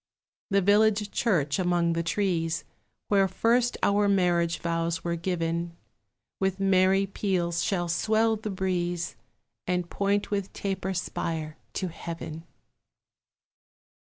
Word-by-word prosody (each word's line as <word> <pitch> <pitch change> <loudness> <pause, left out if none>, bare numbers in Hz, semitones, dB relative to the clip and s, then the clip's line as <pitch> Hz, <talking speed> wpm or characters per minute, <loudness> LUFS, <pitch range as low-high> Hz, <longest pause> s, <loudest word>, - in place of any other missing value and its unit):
The 200 -1 +3
village 210 +1 +3
church 155 - +1
among 175 -2 +2
the 165 - 0
trees, 170 -2 0 0.5
Where 195 -1 +4
first 240 +4 +2
our 205 0 +3
marriage 175 -3 +2
vows 165 0 -1
were 170 0 -1
given, 170 -1 -2 0.6
With 190 0 0
merry 195 0 +4
peals 180 -4 -1
shall 175 -3 0
swell 220 +6 +2
the 215 0 -5
breeze, 175 -3 -2 0.5
And 180 -1 -1
point 200 +1 0
with 200 -2 -1
taper 190 -1 -3
spire 160 -3 -3 0.2
to 185 - -2
Heaven. 165 -1 -7
180 Hz, 115 wpm, -27 LUFS, 170-200 Hz, 0.6 s, Where